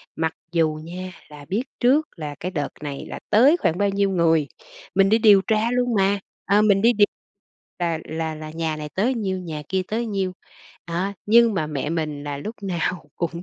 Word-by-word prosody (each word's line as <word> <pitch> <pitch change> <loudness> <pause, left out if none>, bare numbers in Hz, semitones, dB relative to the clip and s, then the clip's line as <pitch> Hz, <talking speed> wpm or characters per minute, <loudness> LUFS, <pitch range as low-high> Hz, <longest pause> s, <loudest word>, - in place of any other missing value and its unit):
Mặc 160 +1 -1 0.2
dù 160 -3 +1
nha 185 +3 -7 0.2
là 145 -1 -11
biết 210 - -1 0.2
trước 280 +5 +3
là 150 -3 -6
cái 185 - -4
đợt 145 -6 -2
này 140 -2 -5
là - - -6
tới 265 +10 +6
khoảng 170 - 0
bao 200 0 +2
nhiêu 200 0 +1
người, 165 -5 +3 0.5
mình 195 0 +5
đi 220 - +5
điều 210 -3 +6
tra 220 +2 +2
luôn 245 -1 +1
mà, 200 0 +2 0.3
à, 205 +2 +4
mình 200 -2 +4
đi 235 +2 +5
điều 205 -2 +5 0.7
là 170 -2 0
là 160 0 -3
là 155 0 -8
nhà 160 -1 -2
này 150 0 -6
tới 230 +7 +1
nhiêu, 195 -5 -2
nhà 160 -4 -6
kia 190 0 0
tới 230 +2 -1
nhiêu, 195 -3 -1 0.5
đó, 175 +4 -2
nhưng 230 +1 +6
mà 160 -5 0
mẹ 150 -1 -3
mình 150 -3 -3
là 145 -1 -4
lúc 215 +10 -6
nào 180 -2 -2
cũng 170 0 -3
185 Hz, 205 wpm, -23 LUFS, 160-210 Hz, 0.7 s, tới